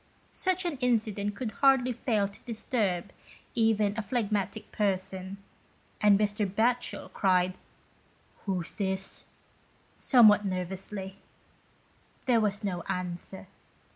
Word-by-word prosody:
Such 370 Hz, -1 st, +1 dB
an 330 Hz, -5 st, -2 dB
incident 215 Hz, -5 st, 0 dB
could 220 Hz, +1 st, -3 dB
hardly 265 Hz, 0 st, +3 dB
fail 220 Hz, -4 st, 0 dB
to 200 Hz, -, -10 dB
dis 230 Hz, -2 st, -6 dB
turb 200 Hz, -7 st, 0 dB, 0.4 s
even 215 Hz, -3 st, +2 dB
a 225 Hz, -, -1 dB
phlegmatic 210 Hz, -3 st, -2 dB
person, 190 Hz, -1 st, -1 dB, 0.6 s
and 205 Hz, -1 st, +6 dB
Mr. 210 Hz, 0 st, 0 dB
Batchel 240 Hz, +4 st, 0 dB
cried 185 Hz, -2 st, +2 dB, 0.9 s
"Who's 185 Hz, -4 st, -2 dB
this?" 190 Hz, -1 st, -3 dB, 0.7 s
somewhat 215 Hz, -6 st, +6 dB
nervously. 190 Hz, +1 st, -4 dB, 1.1 s
There 240 Hz, -4 st, +4 dB
was 205 Hz, 0 st, -1 dB
no 180 Hz, -4 st, -2 dB
answer. 180 Hz, +1 st, -4 dB
205 Hz, 105 wpm, -29 LUFS, 190-230 Hz, 1.1 s, and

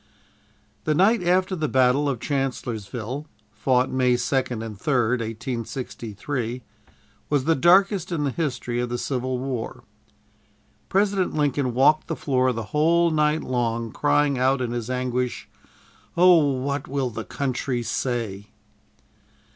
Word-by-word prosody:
The 155 Hz, -, +2 dB
night 195 Hz, +6 st, +4 dB
after 185 Hz, +2 st, +2 dB
the 155 Hz, -3 st, -1 dB
battle 130 Hz, +2 st, +3 dB
of 130 Hz, -4 st, -2 dB
Chancellorsville 125 Hz, -1 st, -3 dB, 0.2 s
(fought 125 Hz, +4 st, +1 dB
May 125 Hz, -1 st, +2 dB
2nd 125 Hz, -2 st, -1 dB
and 110 Hz, -2 st, -7 dB
3d, 125 Hz, +1 st, +1 dB
1863), 115 Hz, +1 st, -4 dB, 0.7 s
was 145 Hz, -3 st, +2 dB
the 165 Hz, -, +3 dB
darkest 185 Hz, +4 st, +4 dB
in 160 Hz, -4 st, -1 dB
the 140 Hz, -, 0 dB
history 125 Hz, -6 st, -2 dB
of 125 Hz, 0 st, -1 dB
the 120 Hz, -, -2 dB
Civil 130 Hz, 0 st, -2 dB
War. 125 Hz, -3 st, -4 dB, 1.1 s
President 195 Hz, -2 st, +1 dB
Lincoln 140 Hz, -4 st, 0 dB
walked 150 Hz, +4 st, +4 dB
the 165 Hz, -, -2 dB
floor 130 Hz, -3 st, +1 dB
the 115 Hz, -2 st, -4 dB
whole 165 Hz, +3 st, +3 dB
night 150 Hz, 0 st, +1 dB
long, 115 Hz, -2 st, -1 dB
crying 145 Hz, -1 st, +2 dB
out 130 Hz, +1 st, +2 dB
in 125 Hz, -2 st, -2 dB
his 120 Hz, -1 st, -4 dB
anguish, 125 Hz, -1 st, -2 dB, 0.7 s
"O 180 Hz, +1 st, +7 dB, 0.2 s
what 140 Hz, +1 st, -3 dB
will 135 Hz, -2 st, -2 dB
the 115 Hz, 0 st, -5 dB
country 130 Hz, -2 st, -2 dB
say!" 115 Hz, -4 st, -3 dB
130 Hz, 130 wpm, -24 LUFS, 120-150 Hz, 1.1 s, O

